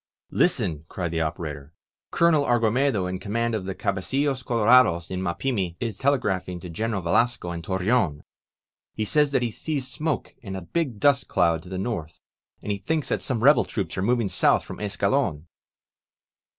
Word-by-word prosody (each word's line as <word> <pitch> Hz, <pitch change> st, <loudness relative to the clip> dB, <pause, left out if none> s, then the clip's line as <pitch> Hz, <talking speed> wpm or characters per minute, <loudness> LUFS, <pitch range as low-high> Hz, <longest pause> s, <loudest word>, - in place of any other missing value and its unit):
Listen!'' 75 Hz, -3 st, +1 dB
cried 85 Hz, -3 st, -3 dB
the 80 Hz, -1 st, -1 dB
operator. 75 Hz, -2 st, -4 dB, 0.4 s
"Colonel 170 Hz, -4 st, +3 dB
Argumedo 120 Hz, -3 st, +2 dB
in 90 Hz, 0 st, -3 dB
command 115 Hz, +3 st, -1 dB
of 105 Hz, -4 st, -2 dB
the 95 Hz, -1 st, -4 dB
cabecttlos 130 Hz, +8 st, -1 dB
colorados 115 Hz, -8 st, +4 dB
in 95 Hz, 0 st, -2 dB
Mapimi 95 Hz, 0 st, -1 dB
is 115 Hz, -4 st, -4 dB
telegraphing 100 Hz, -10 st, 0 dB
to 90 Hz, -, -8 dB
Greneral 105 Hz, +2 st, -2 dB
Yelasco 90 Hz, 0 st, +1 dB
in 85 Hz, -, -5 dB
Torreon. 95 Hz, -2 st, 0 dB, 0.7 s
He 110 Hz, -, -1 dB
says 150 Hz, +6 st, +2 dB
that 130 Hz, -3 st, +1 dB
he 120 Hz, -, -1 dB
sees 140 Hz, +1 st, -3 dB
smoke 150 Hz, +3 st, -3 dB
and 95 Hz, -5 st, -6 dB
a -, -, -6 dB
big 130 Hz, -, -2 dB
dust 140 Hz, 0 st, +3 dB
cloud 85 Hz, -2 st, +2 dB
to 90 Hz, -, -12 dB
the 95 Hz, -, -4 dB
north, 95 Hz, -6 st, -4 dB, 0.4 s
and 100 Hz, -1 st, -3 dB
thinks 160 Hz, -2 st, -1 dB
that -, -, 0 dB
some 115 Hz, -4 st, -2 dB
rebel 145 Hz, +3 st, +6 dB
troops 95 Hz, -7 st, -4 dB
are 95 Hz, -, -2 dB
moving 115 Hz, +1 st, +1 dB
south -, -, +2 dB
from -, -, -8 dB
Escalon 105 Hz, -, 0 dB
105 Hz, 165 wpm, -25 LUFS, 90-125 Hz, 0.7 s, rebel